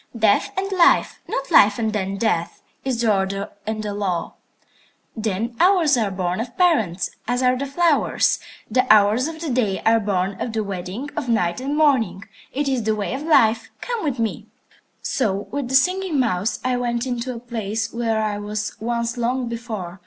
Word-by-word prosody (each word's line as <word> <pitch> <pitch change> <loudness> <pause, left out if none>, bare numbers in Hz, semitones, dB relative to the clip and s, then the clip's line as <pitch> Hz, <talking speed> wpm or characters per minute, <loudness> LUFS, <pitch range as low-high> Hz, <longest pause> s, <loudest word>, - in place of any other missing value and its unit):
Death 215 -2 +3
and 390 +1 -1
life, 370 -3 +3
not 275 - -4
life 205 0 +6
and 220 -2 -1
then 195 -1 -2
death, 185 -6 -1 0.2
is 255 -3 -1
the 220 -3 +3
order 195 +1 -2 0.2
and 215 0 -2
the 205 -1 -3
law. 195 -4 -2 0.8
"The 220 +1 -2
hours 350 -6 +4
are 220 -4 +1
born 185 -1 -2
of 245 +1 -7
parents, 220 - +2 0.2
as 245 +2 0
are 250 0 +4
the 275 +2 -3
flowers. 320 +1 +2 0.3
The 250 +2 +2
hours 215 +5 +5
of 320 0 -7
the 320 -5 -3
day 215 -6 0
are 225 0 +5
born 195 -2 -1
of 235 - -3
the 220 -1 0
wedding 200 +8 -5
of 280 -5 -3
Night 180 -3 +1
and 280 +3 -2
Morning. 230 - +2 0.3
It 285 +2 -2
is 260 -3 +1
the 220 0 0
way 210 +2 -3
of 265 - -4
Life. 230 -8 +3
Come 475 -4 -3
with 285 -5 -1
me." 225 -2 -2 0.6
So 205 -6 -1
with 280 -2 -2
the 265 - 0
Singing 365 +1 +2
Mouse 215 -4 0
I 255 -1 +1
went 240 0 -1
into 250 0 -3
a - - -6
place 225 -2 -4
where 225 -2 0
I 210 -1 -2
was 210 0 -4
once 235 +1 -2
long 245 +1 -1
before. 215 -6 -6
230 Hz, 190 wpm, -22 LUFS, 205-260 Hz, 0.8 s, life